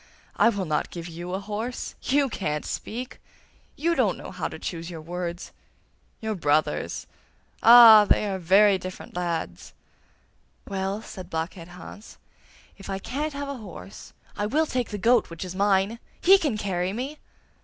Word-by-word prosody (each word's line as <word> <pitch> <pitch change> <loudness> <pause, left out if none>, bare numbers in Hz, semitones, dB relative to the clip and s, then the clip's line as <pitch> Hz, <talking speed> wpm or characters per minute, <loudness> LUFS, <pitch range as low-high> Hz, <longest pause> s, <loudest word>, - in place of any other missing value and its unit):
'I - - +5
will 200 -4 -2
not 155 -2 -1
give 170 -1 -7
you 175 +2 -6
a - - -2
horse. 215 +5 -5
YOU 280 +1 +2
can't 150 - -3
speak; 245 +3 -6 0.5
YOU 335 +3 +1
don't - - +1
know - - -9
how - - -3
to - - -8
choose 170 -1 -5
your 165 -2 -7
words. 175 +2 -5 0.7
Your 220 -1 -2
brothers! 155 -4 0 0.6
Ah! 230 -3 +10
they 210 - +2
are 190 -1 -2
very 195 +3 +5
different 185 -1 -9
lads!' 170 - -4 0.9
'Well,' 195 +2 -3
said 185 -5 -9
Blockhead 165 +1 -4
Hans, 180 +4 -12 0.6
'if 195 - -10
I 195 - -2
can't 285 +9 -4
have 285 0 -4
a 280 - -4
horse, 195 -2 -11 0.2
I 205 - -1
will 310 +8 +2
take 250 -5 -2
the 210 - -4
goat 230 +3 +3
which 170 +2 -6
is 180 - -6
mine; 200 +3 +1 0.2
he 385 +2 +6
can 285 - -1
carry 185 -2 -2
me! 270 +7 -5
195 Hz, 165 wpm, -25 LUFS, 175-230 Hz, 0.9 s, Ah